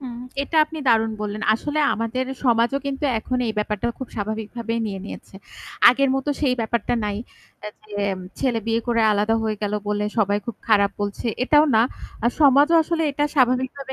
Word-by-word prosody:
হুম, 245 -3 -7 0.2
এটা 320 - -4
আপনি 315 +1 -9
দারুন 225 -1 +3
বললেন। 210 +1 -4
আসলে 295 +7 -3 0.2
আমাদের 230 +3 -2 0.2
সমাজও 240 +2 +2
কিন্তু 275 +1 -3
এখন 250 +3 -3
এই 220 - -1
ব্যাপারটা 210 +1 -2
খুব 260 - -6
স্বাভাবিকভাবে 220 +2 -4
নিয়ে 195 -2 -5
নিয়েছে। 205 - -10 0.5
আগের 270 +3 +3
মত 270 +1 -2
সেই 270 -4 +2
ব্যাপারটা 230 +1 -1
নাই 205 -1 -2 0.7
যেম 200 -2 -2 0.2
ছেলে 250 -4 0
বিয়ে 230 0 +1
করে 235 -1 +1
আলাদা 210 +2 +1
হয়ে 215 -1 -1
গেল 205 0 -1 0.2
বলে 210 0 0
সবাই 205 -1 +2
খুব 235 -3 -5
খারাপ 200 -2 +4
বলছে, 205 +3 -3 0.2
এটাও 295 +3 +5
না। 220 - +6 0.4
আর 235 - +3
সমাজও 290 +3 +5
আসলে 330 +1 -1
এটা 290 +1 0
স্বাভাবিকভাবে 260 0 +1
230 Hz, 170 wpm, -22 LUFS, 210-265 Hz, 0.7 s, না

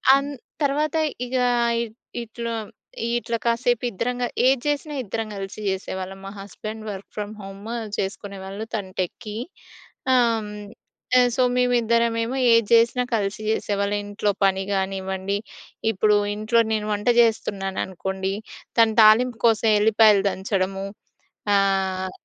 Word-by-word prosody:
అన్ 275 +1 -1 0.3
తర్వాత 295 +2 +1 0.3
ఇగా 250 0 +1 0.3
ఇ - - 0 0.4
ఇట్లా, 235 +1 -5 0.6
ఇట్లా 235 -1 -2
కాసేపు 235 0 +1
ఇద్దరం 240 +5 -2
గా - - +1 0.2
ఏది 265 -1 +3
చేసినా 295 +1 -1
ఇద్దరం 225 +1 -4
గలిసి 195 +1 -6
చేసేవాళ్ళం. 190 0 -4
మా 195 - -6
హస్బెండ్ 215 +2 -7
వర్క్ 195 0 -8
ఫ్రమ్ 210 0 -4
హోము 195 +3 -7 0.2
చేసుకునేవాళ్ళు 195 +1 -5
తను 195 -3 -4
టెక్కి. 210 +4 -5 0.8
ఆహ్, 235 -3 +4
హ్మ్. 210 0 -8 0.5
ఆహ్, 245 0 +5
సో, 255 - +3
మేమిద్దరమేమో 235 0 +2 0.2
ఏది 230 -2 +4
చేసినా 235 +2 +4
కలిసి 205 0 -2
చేసేవాళ్ళం. 205 -1 0
ఇంట్లో 205 0 0
పని 190 0 +2
గానివ్వండి, 190 0 -2 0.5
ఇప్పుడు 210 0 +3 0.2
ఇంట్లో 215 +2 +2
నేను 215 -1 -1
వంట 205 +1 -4
చేస్తున్నాను 195 -4 0
అనుకోండి, 190 +1 -3 0.5
తను 225 -1 +5
తాలింపు 225 +3 +5
కోసం 225 0 +3
ఎల్లిపాయలు 210 -1 +5
దంచడము. 195 0 -2 0.7
ఆహ్ 190 -1 +1
210 Hz, 125 wpm, -23 LUFS, 195-235 Hz, 0.8 s, ఆహ్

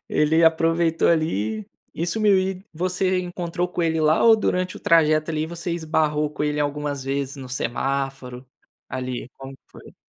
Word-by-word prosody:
ele 160 +2 +2
aproveitou 165 0 +3
ali 110 - 0 0.3
e 170 - -2
sumiu. 205 +1 +3
E 190 0 -2
você 185 +2 0
encontrou 175 0 -3
com 180 - -3
ele 160 -1 +1
lá 155 +1 +3
ou 230 -1 +8
durante 185 -4 -1
o - - -23
trajeto, 155 -1 +3
ali 155 0 -1
você 170 +1 -5
esbarrou 155 -2 0
com 150 - -4
ele 150 0 -1
algumas 145 -1 -2
vezes 140 +1 -3
no 130 -2 -9
semáforo, 135 0 -3 0.4
ali, 125 -1 -5
como 135 0 -9
que 135 - -17
foi? - - -15
155 Hz, 165 wpm, -23 LUFS, 140-170 Hz, 0.4 s, ou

